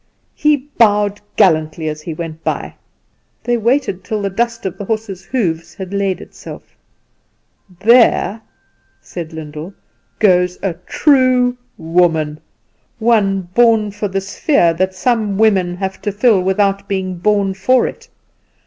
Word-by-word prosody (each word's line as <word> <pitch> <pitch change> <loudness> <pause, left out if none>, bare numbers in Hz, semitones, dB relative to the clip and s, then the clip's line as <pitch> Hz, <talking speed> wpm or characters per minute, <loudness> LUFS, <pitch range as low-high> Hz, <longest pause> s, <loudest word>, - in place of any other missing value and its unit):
He 300 -1 +2 0.2
bowed 205 -2 +3
gallantly 160 -4 +2
as 155 0 -4
he 160 0 -6
went 160 -1 -7
by. - - -3 0.7
They 240 - +1
waited 235 -4 0
till 210 0 -3
the 200 - -1
dust 230 +2 -2
of 190 - -4
the 200 - -5
horse's 205 -3 -4
hoofs 170 -10 -2
had 190 0 -7
laid 195 -2 -1
itself. - - -12 1.1
"There," 225 -2 +4 0.6
said 170 -3 -8
Lyndall, 160 +3 -8 0.4
"goes 180 -3 +3
a 195 -3 0
true 255 -4 +3 0.2
woman 160 -2 +1 0.6
one 215 -4 +2
born 225 -3 +3
for 205 +1 -3
the 195 0 -2
sphere 195 - +1
that 185 +3 -1
some 215 -1 0
women 195 -5 +2
have 190 0 -4
to 205 - -2
fill 205 -1 +3
without 195 +1 0
being 185 -3 -3
born 200 0 +1
for 245 +7 +2
it. - - -7
195 Hz, 135 wpm, -17 LUFS, 180-220 Hz, 1.1 s, There